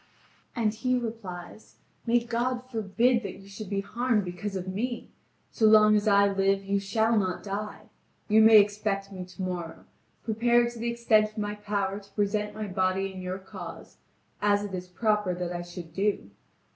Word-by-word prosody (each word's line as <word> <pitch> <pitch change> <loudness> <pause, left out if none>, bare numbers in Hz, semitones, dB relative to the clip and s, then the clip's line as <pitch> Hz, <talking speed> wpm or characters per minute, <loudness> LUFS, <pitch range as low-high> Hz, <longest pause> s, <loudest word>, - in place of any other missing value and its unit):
And 220 -3 +1
he 255 +3 0
replies: 220 -5 -7 0.3
"May 240 +1 +4
God 245 +2 -1
forbid 230 +3 +2
that 200 - -6
you 195 - -14
should 200 0 -8
be 200 -1 -1
harmed 225 0 0
because 180 +3 -5
of 185 -1 -4
me! 235 +6 -3 0.4
So 220 - +3
long 215 0 +7
as 210 +1 +1
I 200 -1 +5
live 195 0 +1
you 200 0 0
shall 220 +3 +1
not 185 -4 0
die! 205 +1 -5 0.5
You 220 0 +5
may 220 0 +9
expect 205 -1 0
me 185 -2 -6
tomorrow, 180 -2 -6 0.4
prepared 235 +2 +2
to 235 - -10
the 235 +1 -1
extent 225 -2 +3
of 215 - -22
my 205 -1 -2
power 205 -1 -2
to 200 -1 -19
present 210 +1 -1
my 215 0 -4
body 190 0 0
in 185 - -7
your 185 +1 -4
cause, 190 - -10 0.4
as 205 0 +3
it 205 -2 -6
is 180 0 -5
proper 210 -1 0
that 175 0 -3
I 175 - -3
should 175 -2 -9
do. 195 - -1
205 Hz, 180 wpm, -28 LUFS, 195-220 Hz, 0.5 s, may